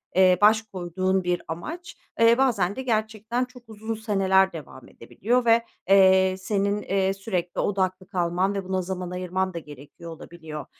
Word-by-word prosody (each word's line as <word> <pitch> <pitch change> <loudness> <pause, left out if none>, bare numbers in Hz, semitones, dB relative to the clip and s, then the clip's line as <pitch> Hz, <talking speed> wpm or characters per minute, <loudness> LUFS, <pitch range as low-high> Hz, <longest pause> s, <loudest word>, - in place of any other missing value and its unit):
eee, 185 -1 +5
baş 215 +1 +5
koyduğun 185 -2 -2
bir 180 0 -1
amaç; 325 - -7 0.2
eee, 230 +1 +5
bazen 205 -8 +1
de 265 - -4
gerçekten 220 +1 -1
çok 250 -1 -16
uzun 220 +1 -5
seneler 190 -3 +2
devam 135 -5 -10
edebiliyor 235 - -2
ve, 230 0 +4 0.2
eee, 190 -1 +5
senin, 200 +1 -1
eee, 195 0 0
sürekli 185 -3 -4
odaklı 185 -2 -1
kalman 185 +1 0
ve 195 - -3
buna 185 0 -2
zaman 180 -1 -5
ayırman 185 +1 -2
da 170 - -4
gerekiyor 150 +3 -12
olabiliyor. 160 -2 -9
190 Hz, 155 wpm, -25 LUFS, 180-215 Hz, 0.2 s, eee